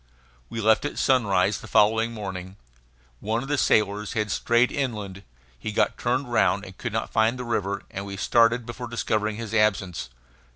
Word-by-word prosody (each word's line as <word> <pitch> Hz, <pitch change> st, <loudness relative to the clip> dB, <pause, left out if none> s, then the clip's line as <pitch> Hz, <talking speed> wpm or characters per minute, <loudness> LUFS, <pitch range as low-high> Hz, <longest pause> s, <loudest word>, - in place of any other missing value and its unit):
We 115 Hz, -, -5 dB
left 110 Hz, 0 st, +4 dB
at 145 Hz, -, -4 dB
sunrise 100 Hz, -7 st, +2 dB
the -, -, -10 dB
following 110 Hz, +2 st, +3 dB
morning. 95 Hz, -4 st, -6 dB, 0.6 s
One 110 Hz, +3 st, -1 dB
of 135 Hz, -, -8 dB
the 145 Hz, -, +2 dB
sailors 105 Hz, +1 st, +1 dB
had 105 Hz, -4 st, -1 dB
strayed 120 Hz, +4 st, +2 dB
inland. 105 Hz, -9 st, -3 dB, 0.4 s
He 110 Hz, -, -4 dB
got 105 Hz, -, +1 dB
turned 125 Hz, +1 st, -1 dB
round 105 Hz, -3 st, +2 dB
and 95 Hz, -, -11 dB
could 120 Hz, -, -5 dB
not 110 Hz, +1 st, -3 dB
find 110 Hz, +3 st, +2 dB
the 125 Hz, -, -5 dB
river; 100 Hz, -4 st, -2 dB
and 100 Hz, -, -5 dB
we 100 Hz, 0 st, -6 dB
started 115 Hz, +3 st, +3 dB
before 120 Hz, +1 st, -6 dB
discovering 110 Hz, -2 st, -1 dB
his 115 Hz, -1 st, -6 dB
absence. 95 Hz, -, +1 dB
110 Hz, 175 wpm, -25 LUFS, 100-120 Hz, 0.6 s, left